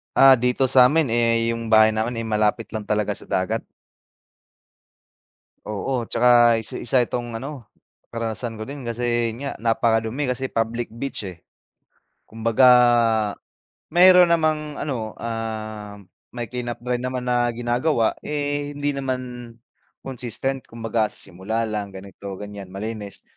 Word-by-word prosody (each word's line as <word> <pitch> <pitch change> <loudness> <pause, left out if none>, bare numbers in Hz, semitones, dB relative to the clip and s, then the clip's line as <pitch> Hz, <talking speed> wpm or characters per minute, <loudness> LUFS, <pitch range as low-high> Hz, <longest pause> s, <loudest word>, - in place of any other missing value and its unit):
Ah, 135 -1 +8
dito 125 +2 +1
sa'min, 135 +2 +5
eh, 115 0 +2
yung 115 0 -4
bahay 110 0 +6
namin, 110 +3 -2
eh, - - -5
malapit 105 +1 0
lang 110 -2 -5
talaga 105 -1 0
sa - - -13
dagat. 110 +5 -1 2.0
Oo. 120 +4 -2
Tsaka 120 0 +5
isa 110 - -7
isa 130 - +1
itong 120 0 -3
ano, 135 -1 -8 0.5
karanasan 115 0 -4
ko 110 - -4
din. 140 -3 -8
Kasi 120 -1 -1
yun 135 +5 -6
nga, - - -3
napakadumi 115 +3 0
kasi 130 +1 -3
public 115 +1 -2
beach, 120 -2 -4
eh. 90 -3 -7 0.9
Kumbaga 115 +3 +3 1.3
meron 180 0 +7
namang 155 -2 0
ano, 115 -7 -3
ah, 110 -2 -5 0.3
may 120 -2 -4
clean-up 120 -1 -5
drive 125 0 -1
naman 130 0 -3
na 120 0 +2
ginagawa. 120 +1 0
Eh, 145 -1 -2
hindi 145 0 -1
naman 130 -2 -2 0.8
consistent. 130 0 -4
Kumbaga 115 -1 -1
sa - - -12
simula 100 +5 -3
lang, 105 -2 -4
ganito, 100 0 -9
ganiyan, 100 -1 -8
malinis. 105 0 -5
115 Hz, 135 wpm, -23 LUFS, 110-130 Hz, 2.0 s, Ah